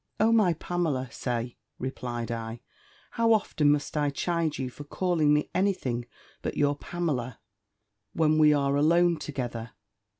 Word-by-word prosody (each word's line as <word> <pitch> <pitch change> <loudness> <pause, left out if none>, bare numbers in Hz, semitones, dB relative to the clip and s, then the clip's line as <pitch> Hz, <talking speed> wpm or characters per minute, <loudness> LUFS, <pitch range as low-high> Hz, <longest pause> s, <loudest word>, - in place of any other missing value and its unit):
"Oh! 220 +1 +4
my 210 -6 +4
Pamela, 155 -6 -2
say," 120 -1 -3 0.2
replied 120 -2 -4
I. 115 0 -5 0.5
"How 230 -1 +3
often 155 -8 +2
must 145 +1 -1
I 145 -1 +2
chide 165 +1 -1
you 130 - -2
for 145 - -9
calling 160 0 +1
me 150 0 +1
any 195 +2 +2
thing 120 -8 -3 0.4
but - - -4
your 145 0 +2
Pamela, 140 -7 -3 0.7
when 155 -1 +3
we 150 -1 +7
are 140 -1 +2
alone 170 +3 +4
together?" 120 -6 -5
145 Hz, 145 wpm, -28 LUFS, 125-170 Hz, 0.7 s, we